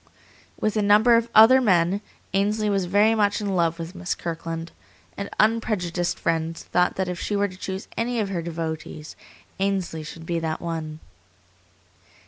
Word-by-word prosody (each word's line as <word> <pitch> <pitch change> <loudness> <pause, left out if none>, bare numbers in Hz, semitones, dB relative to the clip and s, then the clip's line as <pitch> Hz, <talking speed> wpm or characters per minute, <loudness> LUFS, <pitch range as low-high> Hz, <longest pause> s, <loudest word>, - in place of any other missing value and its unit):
With 215 0 0
a 215 - +2
number 210 +4 +5
of 230 0 +1
other 240 +5 +8
men, 185 -3 +2 0.3
Ainsley 210 +2 +1
was 195 -2 +1
very 205 +5 +4
much 205 -2 +2
in 200 -2 -2
love 170 -1 +1
with 165 +1 -6
Miss 180 -1 -3
Kirkland, 165 0 -5 0.4
and 200 0 -5
unprejudiced 205 -6 +1
friends 165 0 -2
thought 180 0 +1
that 190 -1 -1
if 180 -1 -4
she 205 - -2
were 205 0 +2
to 185 - -11
choose 190 +1 -6
any 235 +1 -1
of 205 -3 -1
her 180 -3 -2
devotees, 160 -2 -5 0.4
Ainsley 190 -5 -1
should 160 +2 -9
be 170 0 -1
that 160 -1 -3
one. 160 -2 -5
185 Hz, 165 wpm, -24 LUFS, 165-210 Hz, 0.4 s, other